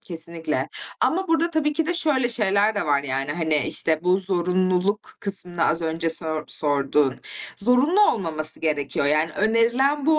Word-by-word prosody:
kesinlikle 165 -1 -3 0.3
ama 375 +2 0
burada 330 +1 +1
tabii 310 -2 0
ki 320 +1 -1
de 355 - -1
şöyle 285 -8 +1
şeyler 210 -2 +1
de 200 - -2
var, 145 -1 +1
yani, 135 +1 -3
hani, 160 -1 0
işte 160 -1 0
bu 180 +1 +3
zorunluluk 185 +1 0 0.2
kısmını 180 -4 -1
az 165 +1 +1
önce 165 0 -1
sör 155 -2 0
sorduğun, 140 -2 +1 0.4
zorunlu 255 - +2
olmaması 155 -6 0
gerekiyor, 145 -2 -1
yani 155 +2 +1
önerilen 235 +7 +1
bu 315 -1 +4
180 Hz, 155 wpm, -22 LUFS, 155-245 Hz, 0.4 s, bu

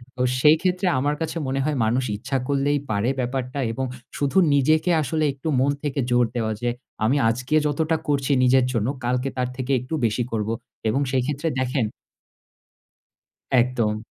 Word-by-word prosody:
তো 125 - -4 0.2
সেইক্ষেত্রে 180 +5 +3
আমার 145 +3 0
কাছে 165 +1 -2
মনে 135 +1 -1
হয় 155 -1 0
মানুষ 120 +4 +1
ইচ্ছা 135 +6 -2
করলেই 145 +1 +1
পারে 100 +3 +1
ব্যাপারটা 130 +2 -2
এবং 130 +4 -2 0.3
শু - - -7
শুধু 140 +5 0 0.2
নিজেকে 155 +5 +3
আসলে 155 +2 -1
একটু 135 +3 -8
মন 135 +2 +3
থেকে 145 -1 -2
জোর 120 0 +4
দেওয়া 110 -2 0
যে, 120 - 0 0.3
"আমি 125 +6 +3
আজকে 125 +6 -1
যতটা 160 +2 0
করছি 140 -1 +1
নিজের 130 0 +4
জন্য, 115 -2 0 0.2
কালকে 125 +2 0
তার 125 -1 0
থেকে 130 +1 -3
একটু 125 +6 -8
বেশি 115 +2 0
করব" 110 -1 -1 0.4
এবং 135 +6 +1
সেই 130 -1 +2
ক্ষেত্রে 145 +3 -2
দেখেন 130 -1 0 1.7
একদম। 120 -4 +2
130 Hz, 165 wpm, -23 LUFS, 125-145 Hz, 1.7 s, জোর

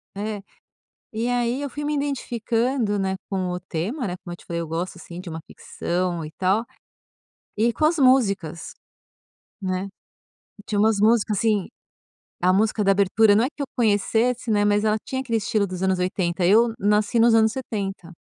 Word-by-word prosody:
É. 205 -1 -4 0.7
E 225 +2 -2
aí, 245 +2 0
eu 285 - -3
fui 295 +2 -5
me 300 0 0
identificando, 240 -5 -1
né, 190 0 -1
com 185 -2 -1
o 180 0 -3
tema, 185 - -4
né. 180 -2 -3
Como 175 - -8
eu - - -6
te - - -19
falei, 170 0 -3
eu 165 - -5
gosto, 170 +3 -4
assim, 175 0 -10
de 185 - -10
uma 160 0 -5
ficção 175 -1 -3
e 155 - -9
tal, 195 +4 +2 0.9
e 230 +3 +2
com 305 - +1
as 330 +2 +2
músicas, 200 - +2 0.9
né. 185 0 -2 0.8
Tinha 210 - -2
umas 220 0 +3
músicas 215 -1 +3
assim, 210 -4 +1 0.8
a 185 +1 +4
música 215 +2 +2
da 195 - +3
abertura, 205 +2 +4
não 225 - +4
é - - 0
que 290 -1 -6
eu - - -3
conhecesse, 230 +2 +1
né, 205 -1 +3
mas 205 0 +2
ela 215 0 +2
tinha 260 - -3
aquele 235 -4 -1
estilo 210 -1 0
dos 185 0 -6
anos 190 -1 +1
80. 180 -1 -1
Eu 225 +6 +5
nasci 210 +3 +2
nos 230 +1 +5
anos 220 0 +4
70, 200 -8 -5
210 Hz, 185 wpm, -23 LUFS, 185-235 Hz, 0.9 s, Eu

